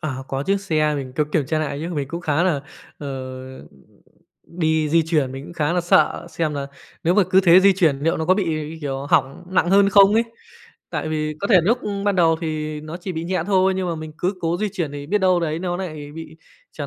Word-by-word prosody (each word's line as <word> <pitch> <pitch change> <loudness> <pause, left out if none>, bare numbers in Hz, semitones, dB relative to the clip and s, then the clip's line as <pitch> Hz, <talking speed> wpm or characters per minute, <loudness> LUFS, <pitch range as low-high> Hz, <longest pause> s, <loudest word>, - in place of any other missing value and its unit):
À, 145 -5 -4
có 135 0 -2
chiếc 195 +5 0
xe 155 -5 +1
mình 135 -3 -5
có 150 - +2
kiểm 150 -5 +1
tra 155 - 0
lại 145 -2 -3
chứ, 170 +1 -4
mình 140 -3 -3
cũng 170 +3 -5
khá 160 -2 0
là, 175 -6 +1 0.4
ờ, 145 - -6 1.4
đi 160 -2 0
di 165 +2 +3
chuyển 155 -5 0
mình 135 +1 -7
cũng - - -10
khá 160 -1 -1
là 180 - +1
sợ 175 0 +2
xem 155 -3 -2
là 140 -1 -3 0.4
nếu 170 +2 +3
mà 205 - +5
cứ 190 - +6
thế 180 -1 +6
di 195 +1 +6
chuyển 165 -7 +2
liệu 165 +3 +1
nó 160 - -2
có 185 +3 +4
bị, 200 0 0
như 155 0 -4
kiểu, 140 -2 -4
hỏng 140 -4 +1
nặng 180 -1 +2
hơn 200 +1 +5
không 200 0 +6
ấy. 225 - +4 0.7
Tại - - -3
vì 155 -1 -2
có 200 - -1
thể 205 - +6
núc 235 +4 +3 0.3
ban 205 -2 +1
đầu 165 -2 +4
thì 155 -2 -3
nó 155 +2 -7
chỉ 180 +1 -6
bị 160 -1 -4
nhẹ 180 -1 -1
thôi 190 -1 +3
nhưng 190 -1 -2
mà 170 - -1
mình 155 -1 -7
cứ 185 +3 -1
cố 165 +1 0
di 215 - -1
chuyển 160 -5 -3
thì 145 0 -7
biết 205 +7 +1
đâu 185 -2 +3
đấy 160 -1 -2
nó 175 0 -2
nại 155 -6 -6
bị 160 0 -10 0.4
trở - - -6
165 Hz, 250 wpm, -21 LUFS, 150-185 Hz, 1.4 s, cứ